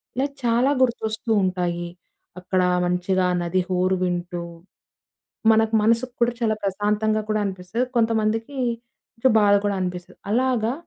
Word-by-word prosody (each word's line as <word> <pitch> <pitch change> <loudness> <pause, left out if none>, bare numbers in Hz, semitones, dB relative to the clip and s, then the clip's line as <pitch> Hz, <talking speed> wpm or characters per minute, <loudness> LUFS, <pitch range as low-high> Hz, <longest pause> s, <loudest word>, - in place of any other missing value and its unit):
ఇలా 270 +2 +1 0.2
చాలా 240 +3 +3
గుర్తొస్తూ 225 -2 0
ఉంటాయి. 175 -2 -2 0.5
అక్కడ 185 +1 0 0.2
మంచిగా 180 +1 +1
ఆ - - +1
నది 180 +2 0
హోరు 185 +1 +1
వింటూ, 175 -1 -2 1.1
మనకు 220 0 +2
మనసు 230 +3 +3 0.2
కూడా 235 0 +3
చాలా 220 -2 +2
ప్రశాంతంగా 210 +2 0
కూడా 215 0 +1
అనిపిస్తది. 190 +6 -3
కొంతమందికి 225 +2 0 0.6
కొంచెం 240 +1 +2
బాధ 205 -1 +5
కూడా 205 -1 0
అనిపిస్తది. 180 -1 -5
అలాగా 245 -1 +1
215 Hz, 125 wpm, -23 LUFS, 185-230 Hz, 1.1 s, బాధ